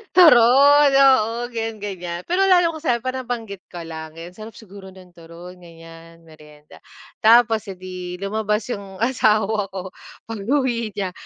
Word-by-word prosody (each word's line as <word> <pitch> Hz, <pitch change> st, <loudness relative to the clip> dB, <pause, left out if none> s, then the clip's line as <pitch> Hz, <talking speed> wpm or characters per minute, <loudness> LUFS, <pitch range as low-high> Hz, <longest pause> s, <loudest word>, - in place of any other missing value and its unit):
turon. 285 Hz, -2 st, +6 dB
Oo, 240 Hz, -3 st, +3 dB
ganyan-ganyan. 200 Hz, -6 st, -6 dB
Pero 385 Hz, +2 st, +1 dB
lalo 355 Hz, -2 st, +4 dB
ko 315 Hz, -, -8 dB
sayo 245 Hz, -7 st, 0 dB
parang 255 Hz, -1 st, -5 dB
banggit 220 Hz, -5 st, -5 dB
ko 175 Hz, -2 st, -9 dB
lang, 160 Hz, -1 st, -9 dB
ayan 170 Hz, +2 st, -9 dB
sarap 215 Hz, +2 st, -12 dB
siguro 200 Hz, -2 st, -13 dB
ng 185 Hz, -1 st, -17 dB
turon 170 Hz, +2 st, -13 dB
ganyan, 165 Hz, 0 st, -15 dB
meryenda. 150 Hz, -2 st, -18 dB, 0.4 s
Tapos, 225 Hz, 0 st, +5 dB
eh, 190 Hz, -, -7 dB
di 180 Hz, -1 st, -8 dB
lumabas 210 Hz, +2 st, -2 dB
yung 195 Hz, -1 st, -9 dB
asawa 215 Hz, -4 st, +1 dB
ko. 190 Hz, -1 st, -8 dB, 0.4 s
Pag-uwi 230 Hz, -1 st, -2 dB
niya, 195 Hz, -3 st, -3 dB
205 Hz, 145 wpm, -20 LUFS, 180-240 Hz, 0.4 s, turon